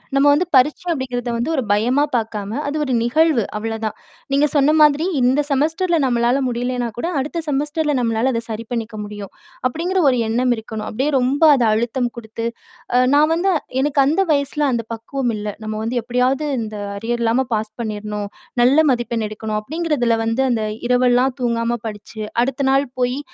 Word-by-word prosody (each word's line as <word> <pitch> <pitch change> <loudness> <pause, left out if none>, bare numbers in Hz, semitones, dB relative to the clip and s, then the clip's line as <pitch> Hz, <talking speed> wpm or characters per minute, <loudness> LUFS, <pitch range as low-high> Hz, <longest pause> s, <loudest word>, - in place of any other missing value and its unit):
நம்ம 275 - +4
வந்து 345 +5 +2
பரீட்சை 280 +7 +3
அப்படிங்கிறத 250 -4 -3
வந்து 240 +7 -2
ஒரு 265 - 0
பயமா 245 +8 +2
பார்க்காம, 215 -3 -2 0.2
அது 290 +2 -2
ஒரு 265 -3 -1
நிகழ்வு, 280 +1 +3
அவ்ளோதான். 220 0 -3 0.4
நீங்க 280 +2 +4
சொன்ன 290 +1 +4
மாதிரி 300 +2 +5 0.2
இந்த 255 +4 +3
செமஸ்டர்ல 320 +5 +1
நம்மளால 240 +2 +2
முடியலனா 245 0 -2
கூட, 285 - -2
அடுத்த 320 +5 -3
செமஸ்டர்ல 295 +1 0
நம்மளால 230 +2 +1
அத 230 - -1
சரி 220 +1 -5
பண்ணிக்க 230 -2 -3
முடியும். 205 -1 -8 0.4
அப்படிங்கிற 355 +6 -1
ஒரு 250 -2 +1
எண்ணம் 245 +2 +2
இருக்கணும். 220 -1 -6
அப்படியே 265 +7 -1
ரொம்ப 265 +5 +1
அத 245 -3 +2
அழுத்தம் 240 +3 0
குடுத்து, 230 0 -6 0.5
அ 250 - +6 0.2
நான் 300 +2 +5
வந்து 370 +3 +1 0.3
எனக்கு 280 0 +2
அந்த 320 +8 +2
வயசுல 285 0 +1
அந்த 230 -2 -2
பக்குவம் 240 +2 -3
இல்ல. 210 0 -5 0.2
நம்ம 215 0 -3
வந்து 240 +2 -2
எப்படியாவது 250 +5 0
இந்த 215 -1 -5 0.2
அரியர் 235 +3 -2
இல்லாம 235 +3 +2
பாஸ் 215 0 -3
பண்ணிறணும். 210 -2 -4 0.4
நல்ல 260 +4 +4
மதிப்பெண் 235 -3 -1
எடுக்கணும் 215 0 -3
அப்படிங்கறதுல 280 -3 0
வந்து 225 +3 0
அந்த 225 -2 0 0.2
இரவெல்லாம் 250 +1 +3
தூங்காம 235 0 0
படிச்சு, 215 +1 -7 0.2
அடுத்த 270 +1 -1
நாள் 275 +1 +2
போயி 250 +2 0
245 Hz, 165 wpm, -20 LUFS, 225-280 Hz, 0.5 s, அ